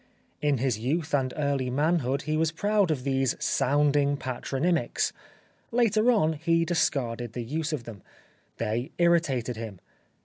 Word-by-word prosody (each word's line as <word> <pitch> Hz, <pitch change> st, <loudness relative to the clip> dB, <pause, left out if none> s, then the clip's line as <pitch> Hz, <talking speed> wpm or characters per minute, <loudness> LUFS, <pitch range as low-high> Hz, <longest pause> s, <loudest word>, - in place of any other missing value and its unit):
In 145 Hz, -2 st, +2 dB
his 125 Hz, -3 st, 0 dB
youth 150 Hz, +7 st, -2 dB
and 130 Hz, -3 st, +1 dB
early 140 Hz, -3 st, 0 dB
manhood 140 Hz, 0 st, +1 dB
he 155 Hz, +2 st, -1 dB
was 160 Hz, 0 st, +1 dB
proud 205 Hz, +2 st, +1 dB
of 145 Hz, -5 st, -1 dB
these 135 Hz, -1 st, +1 dB
sounding 145 Hz, +1 st, +2 dB
patronymics. 135 Hz, +6 st, -1 dB, 0.6 s
Later 230 Hz, -1 st, +3 dB
on 160 Hz, -9 st, +2 dB
he 165 Hz, +2 st, +1 dB
discarded 120 Hz, -9 st, -1 dB
the 120 Hz, -, -4 dB
use 155 Hz, +6 st, -2 dB
of 150 Hz, -6 st, -3 dB
them. 110 Hz, -5 st, -10 dB, 0.6 s
They 115 Hz, +5 st, -2 dB
irritated 150 Hz, -9 st, +2 dB
him. 110 Hz, -5 st, -7 dB
145 Hz, 140 wpm, -27 LUFS, 125-165 Hz, 0.6 s, Later